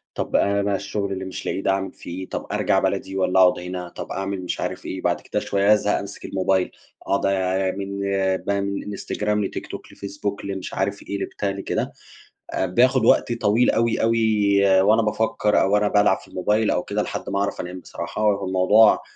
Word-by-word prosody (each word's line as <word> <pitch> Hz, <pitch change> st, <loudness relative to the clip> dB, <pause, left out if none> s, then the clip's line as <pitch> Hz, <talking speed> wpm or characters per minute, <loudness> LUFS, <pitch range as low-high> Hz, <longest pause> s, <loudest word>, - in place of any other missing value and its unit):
طب -, -, -3 dB
أنا 100 Hz, 0 st, +3 dB
بقى 100 Hz, 0 st, 0 dB
الشغل 100 Hz, 0 st, -3 dB
اللي 95 Hz, -1 st, -4 dB
مش 95 Hz, -, -7 dB
لاقيه 95 Hz, -, -2 dB
ده 95 Hz, -, +2 dB
أعمل 95 Hz, -1 st, -1 dB
في -, -, -11 dB
إيه؟ 95 Hz, +2 st, -6 dB
طب -, -, -5 dB
أرجع -, -, +2 dB
بلدي، 95 Hz, -, -2 dB
والّا 95 Hz, 0 st, +2 dB
أقعد 90 Hz, -1 st, +5 dB
هنا؟ 90 Hz, 0 st, -6 dB
طب -, -, -8 dB
أعمل 95 Hz, 0 st, -3 dB
مش 90 Hz, -, -3 dB
عارف -, -, -4 dB
إيه، -, -, -5 dB
بعد -, -, 0 dB
كده -, -, -2 dB
شوية 100 Hz, +1 st, +3 dB
أزهق 105 Hz, -1 st, +1 dB
أمسك 100 Hz, 0 st, -8 dB
الموبايل، 95 Hz, -1 st, 0 dB, 0.3 s
أقعد 100 Hz, -, 0 dB, 0.5 s
من 100 Hz, 0 st, -4 dB, 0.4 s
بقى، 100 Hz, 0 st, 0 dB
من 100 Hz, 0 st, -3 dB
إنستجرام 105 Hz, +1 st, -2 dB
لتيك -, -, -5 dB
توك، -, -, -9 dB
لفيسبوك 100 Hz, 0 st, -5 dB
لمش 95 Hz, -2 st, -5 dB
عارف 100 Hz, +1 st, -2 dB
إيه 100 Hz, -, -4 dB
لبتاع 100 Hz, -, -3 dB
لكده، 100 Hz, 0 st, -3 dB, 0.6 s
آآ -, -, 0 dB
باخد 125 Hz, +5 st, +3 dB
وقت 120 Hz, -, +4 dB
طويل 115 Hz, +1 st, +2 dB
أوي، 115 Hz, 0 st, +1 dB
أوي 100 Hz, -4 st, +3 dB
وأنا 110 Hz, +3 st, +4 dB
بافكر 105 Hz, -1 st, +1 dB
أو 95 Hz, +1 st, +2 dB
وأنا 105 Hz, 0 st, +3 dB
بالعب 105 Hz, -2 st, +3 dB
في -, -, -16 dB
الموبايل 105 Hz, +4 st, +1 dB
أو 90 Hz, -, 0 dB
كده، 105 Hz, +1 st, -2 dB
لحد -, -, -4 dB
ما 100 Hz, 0 st, -1 dB
أعرف 100 Hz, -, -1 dB
أنام 90 Hz, +1 st, -7 dB
بصراحة، 90 Hz, -, -6 dB
هو 100 Hz, -2 st, +2 dB
الموضوع 95 Hz, +4 st, +5 dB
100 Hz, 195 wpm, -23 LUFS, 95-105 Hz, 0.6 s, أقعد